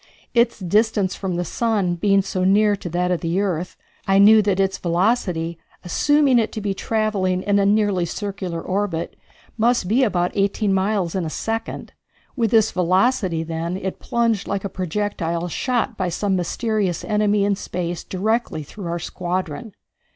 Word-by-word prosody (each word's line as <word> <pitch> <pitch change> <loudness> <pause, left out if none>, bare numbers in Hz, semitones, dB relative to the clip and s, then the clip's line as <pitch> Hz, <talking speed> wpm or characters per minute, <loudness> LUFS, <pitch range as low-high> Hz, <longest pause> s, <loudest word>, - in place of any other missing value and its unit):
Its 235 -1 +3
distance 205 0 +1
from 190 -3 -3
the 175 +1 -2
sun 205 -2 0
being 195 +3 +2
so 185 -1 -2
near 205 +2 +4
that 180 -1 -2
of 180 - 0
the 170 +2 0
earth, 180 -3 -2 0.3
I 195 0 +4
knew 215 +2 +7
that 200 -2 0
its 195 0 +1
velocity, 170 -2 0 0.3
assuming 280 - +3
it 225 - 0
to - - -3
be 205 -1 -2
travelling 195 -3 -1
in 205 0 +2
a 200 - +3
nearly 205 -4 +2
circular 190 -3 -4
orbit, 185 -3 -2 0.4
must 235 -4 +2
be 230 +7 +3
about 180 -7 +1
eighteen 200 0 +1
miles 190 -2 0
in 190 - -1
a 160 - -3
second. 225 +7 -4 0.4
With 230 -4 +1
this 220 -1 +4
velocity, 185 -1 +1
then, 165 +2 -3
it 190 -1 -5
plunged 230 -4 0
like 200 -1 -2
a - - -2
projectile 180 -2 -2
shot 245 - -1
by 185 -2 -1
some 195 +3 -1
mysterious 190 0 -1
enemy 210 -1 +2
in 200 0 +2
space 175 -3 -4
directly 210 -4 -1
through 180 +5 -8
our 170 0 -2
squadron. 175 +2 -4
195 Hz, 165 wpm, -21 LUFS, 180-215 Hz, 0.4 s, knew